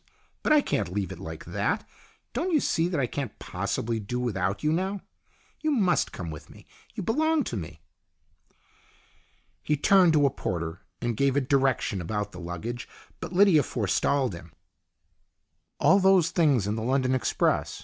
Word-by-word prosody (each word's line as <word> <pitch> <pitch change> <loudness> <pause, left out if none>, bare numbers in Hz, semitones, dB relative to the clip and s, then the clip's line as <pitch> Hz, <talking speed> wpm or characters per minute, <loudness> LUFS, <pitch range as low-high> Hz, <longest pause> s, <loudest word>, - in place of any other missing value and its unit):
But - - 0
I 305 -1 +6
can't 100 - -1
leave 95 -1 -2
it 95 - -8
like 80 -4 -8
that. - - -2 0.5
Don't 330 +10 -1
you 310 - +4
see 165 -9 +1
that 175 -4 -1
I 135 - +2
can't 130 -1 -5
possibly 115 0 -3
do 115 +4 -4
without 100 -5 -1
you 150 +1 +2
now? 190 +3 -1 0.6
You 310 - -1
must 205 -11 +2
come 85 -3 -6
with 75 - -10
me. - - -15 0.3
You - - -4
belong 315 - +2
to 120 - -5
me." 80 -5 -7 1.8
He 150 - 0
turned 180 +2 +5
to 145 -2 +4
a 140 - +3
porter 85 -2 -4 0.2
to 120 0 0
give 135 +3 +1
a - - +4
direction 135 -7 +1
about 105 +3 -3
the 90 - -10
luggage, 90 +8 -6 0.3
but - - -6
Lydia 185 -4 +5
forestalled 125 +2 0
him. 85 -1 -11 0.7
" - - -50
All 195 - +5
those 190 -3 +4
things 145 - +3
in 105 - -1
the 110 - -3
London 130 +2 +1
express. 130 - 0
130 Hz, 170 wpm, -27 LUFS, -, 1.8 s, I